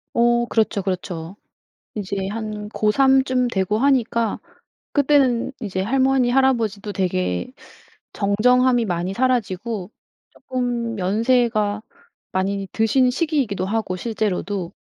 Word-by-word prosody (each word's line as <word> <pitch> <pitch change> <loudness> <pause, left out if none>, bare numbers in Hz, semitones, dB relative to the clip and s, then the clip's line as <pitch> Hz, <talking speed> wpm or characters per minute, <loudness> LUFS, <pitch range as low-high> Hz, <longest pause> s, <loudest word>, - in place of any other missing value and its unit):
어 240 0 +3
그렇죠, 220 -4 0
그렇죠. 180 -2 -4 0.6
이제 200 -2 -4
한 215 -1 -5
고 215 -1 +1
3 265 +3 +4
쯤 250 -1 +1
되고 205 -1 0
하니까 235 -4 +1 0.5
그때는 275 -4 +2
이제 190 -3 -3
할머니, 260 +4 +2
할아버지도 230 -6 +1
되게 90 - -1 0.6
정정함이 245 +4 +3
많이 180 0 -2
사라지고 225 -5 -1 0.4
쪼끔 240 -3 -3
연세가 215 +1 +1 0.5
많이 195 +1 -1
드신 250 +4 +3
시기이기도 260 - -1
하고 205 -3 -2
실제로도, 200 -3 -2
220 Hz, 250 characters per minute, -21 LUFS, 195-250 Hz, 0.6 s, 3